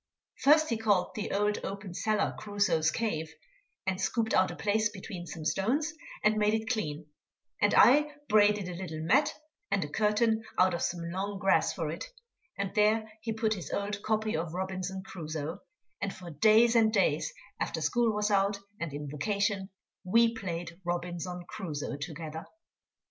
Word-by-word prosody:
First 310 +3 +5
he 230 - 0
called 205 -5 +2
the 210 - -4
old 210 +1 +1
open 195 -2 -5
cellar 210 +3 0
Crusoe's 200 -7 +1
cave, 160 -5 -2 0.5
and 190 0 -1
scooped 220 +3 0
out 185 - +4
a - - -6
place 215 0 +1
between 190 -3 -8
some 160 -1 -7
stones 275 - +1 0.3
and 215 0 +4
made 210 +1 +3
it 220 +2 -3
clean, 155 -9 -2 0.6
and - - +4
I 295 +4 +6 0.2
braided 210 -2 +4
a 180 - -5
little 170 -3 -5
mat 265 - +4 0.4
and 195 -6 +1
a - - -8
curtain 220 +4 +2 0.2
out 185 0 +4
of 170 - -2
some 170 -1 -2
long 195 +2 -3
grass 195 0 +3
for - - -3
it, - - -5 0.5
and 200 -1 -2
there 215 0 +2
he 225 +1 -3
put 220 0 +1
his 185 -5 -6
old 205 +1 -2
copy 215 0 0
of 165 +1 -3
Robinson 190 0 -3
Crusoe, 155 -4 -5 0.4
and 200 - -1
for 180 -3 -9
days 220 +9 +5
and 220 -1 +5
days, - - +2 0.3
after - - -2
school 240 -2 +2
was 210 0 0
out, 200 0 +3 0.2
and 170 -3 -3
in 145 0 -5
vacation, 200 +6 -1 0.3
we 230 +5 +4
played 175 -4 -5
Robinson 175 0 -3
Crusoe 150 -7 -4
together. 160 +1 -6
200 Hz, 165 wpm, -30 LUFS, 175-220 Hz, 0.6 s, I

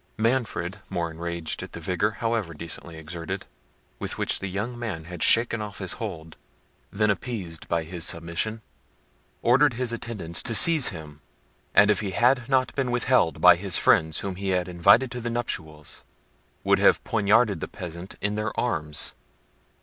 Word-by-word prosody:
Manfred, 110 -5 -1
more 85 -3 -2
enraged 85 0 -4
at - - -9
the - - -6
vigour, 90 +5 0
however 115 -8 -1
decently 85 +1 -6
exerted, 80 +1 -6 0.5
with - - -3
which - - +1
the 100 - -4
young 110 +6 -4
man 100 -9 -4
had 85 0 -9
shaken 115 -1 +4
off 105 -1 -7
his 95 -3 -2
hold, 80 -7 -6 0.5
than 105 +1 +2
appeased 95 -6 -5
by 85 -1 0
his 85 +1 -5
submission, 85 +7 -2 0.8
ordered 130 +3 +4
his 125 -1 -1
attendants 105 -8 -2
to 115 - -1
seize 160 +1 +6
him, 75 -4 -7 0.5
and, 100 +1 +7
if 105 - +1
he 105 - -2
had 125 +1 +3
not 130 -1 +2
been 135 -3 -1
withheld 125 -7 +2
by - - +8
his - - +1
friends 80 -1 +3
whom 95 -2 -5
he 100 0 -3
had 90 -1 0
invited 100 +9 +4
to 125 -1 -5
the 120 - -3
nuptials, 80 -10 -5 0.6
would - - +3
have - - +4
poignarded 105 -2 +2
the - - -4
peasant 85 +1 -8
in 105 +1 0
their 105 +1 -3
arms. 75 -11 -1
100 Hz, 165 wpm, -25 LUFS, 85-115 Hz, 0.8 s, by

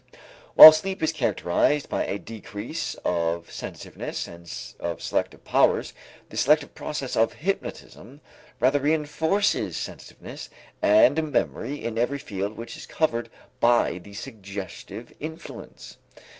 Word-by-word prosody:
While 155 - +14
sleep 190 +3 -3
is 160 - +2
characterized 135 - +1
by - - -2
a 100 - -2
decrease 115 +6 -6
of 85 -1 -1
sensitiveness - - -6
and 85 0 -11 0.3
of 85 -3 -4
selective - - -3
powers, - - +2 0.4
the - - -9
selective 150 +1 +3
process 140 -4 -5
of 115 +1 +2
hypnotism 150 -6 -5 0.4
rather 135 +3 +3
reënforces 150 - 0
sensitiveness - - -8 0.3
and 145 +9 +4
memory 145 +2 -2
in 115 -1 -2
every 130 +4 0
field 100 -4 -5
which 115 0 -7
is - - -10
covered 120 -7 -1 0.3
by 120 -6 +3
the 100 +3 -14
suggestive 100 -5 -8
influence. 160 +2 -9
120 Hz, 120 wpm, -25 LUFS, 100-150 Hz, 0.4 s, While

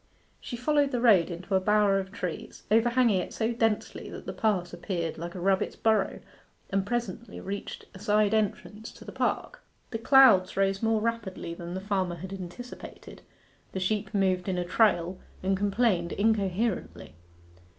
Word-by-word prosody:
She 240 - -6
followed 285 +3 +2
the 250 - -1
road 205 -9 +5
into 175 +3 -6
a 190 - +5
bower 205 0 +3
of 190 0 -6
trees, 215 +1 -6
overhanging 235 -2 +4
it - - -7
so 225 +1 0
densely 225 -2 -1
that - - -9
the - - -5
pass 190 -5 0
appeared 170 -5 -3
like 170 +2 -6
a - - -5
rabbit's 190 +1 +1
burrow, 215 -3 +1 0.5
and 195 0 0
presently 235 -1 -3
reached 200 +1 -6
a 190 - -11
side 210 +1 +2
entrance 215 0 -2
to - - -14
the - - -8
park. - - -2 0.3
The 225 - -3
clouds 225 -8 +6
rose 195 0 +1
more 225 -1 +2
rapidly 215 -7 -3
than 170 +1 -7
the 190 - -4
farmer 190 -3 -1
had 190 +2 -8
anticipated: 195 +7 -9 0.5
the 190 - -2
sheep 200 +3 -1
moved 190 -3 +1
in 185 - -1
a 175 - -1
trail, 180 -2 +2 0.2
and 195 +1 +2
complained 200 -3 +1
incoherently. 205 0 -1
200 Hz, 165 wpm, -28 LUFS, 185-225 Hz, 0.5 s, clouds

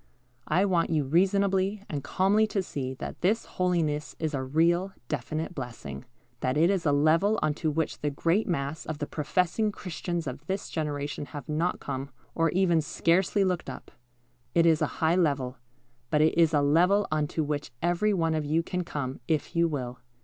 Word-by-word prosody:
I 180 +6 +3
want 175 -4 +2
you 155 -3 +1
reasonably 195 +5 +2
and 145 -3 -4
calmly 195 +8 +2
to 200 -2 -1
see 130 -6 -4
that - - -7
this 210 +6 +2
holiness 165 -5 -1
is 160 -1 -2
a 135 - -1
real, 170 +7 +2 0.2
definite 155 +5 -3
blessing; 115 - -7 0.3
that 130 +2 0
it 170 +5 +4
is 185 -5 0
a - - +4
level 160 +9 +3
on 150 - +2
to 160 - +2
which 160 +1 -1
the 150 - 0
great 165 +8 +1
mass 155 -3 -2
of 155 - -3
the 145 - -3
professing 180 +8 0
Christians 175 -3 -4
of 135 +1 -6
this 190 +1 -3
generation 145 -2 -3
have 145 - -8
not 165 +4 0
come, 135 +1 -4 0.2
or 165 0 +2
even 175 -2 +3
scarcely 175 +6 +2
looked 180 -3 -1
up. - - -9 0.6
It 170 -1 +5
is 160 -2 +4
a - - +3 0.2
high 160 +2 +4
level, 140 -7 +1 0.5
but 150 - +3
it 155 - +3
is 165 -1 +4
a 150 -2 +3
level 180 +8 +4
on 155 -1 +1
to 155 - -1
which 145 0 -3
every 175 +5 +2
one 165 -5 +1
of 155 -1 0
you 155 +3 +1
can 180 +1 -2
come, 135 -5 -4
if 160 +2 -1
you 170 0 +4
will. 125 -5 -4
160 Hz, 190 wpm, -28 LUFS, 145-180 Hz, 0.6 s, It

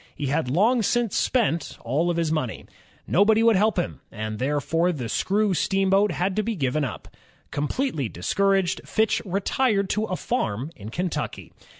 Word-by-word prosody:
He 145 - -4
had 140 -1 0
long 220 - +3
since 235 0 0
spent 205 -10 0
all 155 +9 0
his 165 -2 0
own - - +1
money. 130 -8 -3 0.4
Nobody 215 +4 +4
would 230 -1 +5
help 210 +2 +2
him, 175 - -2
and 110 -1 -5
therefore 150 +6 +1
the 130 -8 -4
screw 200 - +1
steamboat 195 +3 +2
had 185 +2 -1
to - - +3
be 225 +1 -2
given 145 -2 0
up. 135 - -5 0.4
Completely 150 - -1
discouraged, 195 - +1
Fitch 220 0 +1
retired 200 +2 +1
to 215 +1 0
a 185 - -3
farm 135 - -2
in 105 +1 -9
Kentucky. 175 +7 -4
180 Hz, 165 wpm, -24 LUFS, 145-210 Hz, 0.4 s, would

